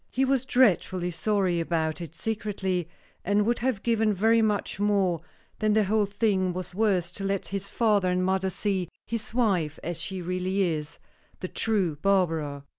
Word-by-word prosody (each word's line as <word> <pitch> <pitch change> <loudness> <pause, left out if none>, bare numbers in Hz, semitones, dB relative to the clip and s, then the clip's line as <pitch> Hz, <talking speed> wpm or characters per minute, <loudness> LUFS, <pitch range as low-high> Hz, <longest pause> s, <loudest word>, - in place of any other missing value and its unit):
He 265 +2 +1
was 265 -1 +1
dreadfully 185 -8 +2
sorry 185 0 0
about 160 -1 -1
it 165 -1 -8
secretly, 190 -5 -2 0.3
and 205 +2 +2
would 235 +2 +1
have 245 -5 -1
given 220 -3 +2
very 225 +4 +4
much 210 -2 -1
more 195 -5 +2 0.4
than 215 -1 +2
the 215 0 +4
whole 210 +1 +1
thing 200 -3 +1
was 185 0 -5
worth 185 -4 +1
to 195 - -5
let 195 -1 -2
his 200 0 -4
father 210 -5 +2
and 180 0 +1
mother 190 0 +1
see 190 -2 -1 0.2
his 230 +1 -4
wife 195 -11 +1
as 170 0 -4
she 190 -1 -4
really 185 +2 -1
is 155 -4 -2 0.4
the 185 - -4
true 190 -8 0
Barbara. 160 -6 0
195 Hz, 170 wpm, -27 LUFS, 175-215 Hz, 0.4 s, very